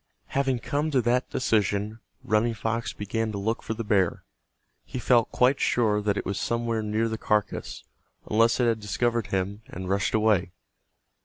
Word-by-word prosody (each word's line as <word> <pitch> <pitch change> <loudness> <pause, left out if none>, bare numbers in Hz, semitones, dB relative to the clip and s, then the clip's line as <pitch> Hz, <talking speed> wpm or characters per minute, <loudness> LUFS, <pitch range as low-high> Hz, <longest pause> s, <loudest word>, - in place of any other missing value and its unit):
Having 135 -2 +1
come 150 +1 -1
to 135 -4 +2
that 125 +2 +1
decision 105 -2 0 0.2
Running 115 +2 +1
Fox 115 +2 -2
began 110 +2 -2
to - - -3
look 110 +4 -1
for 110 - -4
the 115 - -4
bear. 100 -5 +1 0.6
He - - -7
felt 120 -2 +3
quite 130 +2 +3
sure 105 -3 +2
that 105 -1 0
it - - -3
was 100 - -2
somewhere 115 -1 -1
near 110 +2 0
the 110 -1 -4
carcass, 105 -1 -1 0.4
unless 115 +3 +3
it 125 - +3
had 115 -2 +2
discovered 115 +1 -1
him 95 +2 -2
and 95 +1 -7
rushed 100 +2 +1
away. 105 -5 +2
110 Hz, 170 wpm, -26 LUFS, 105-120 Hz, 0.6 s, felt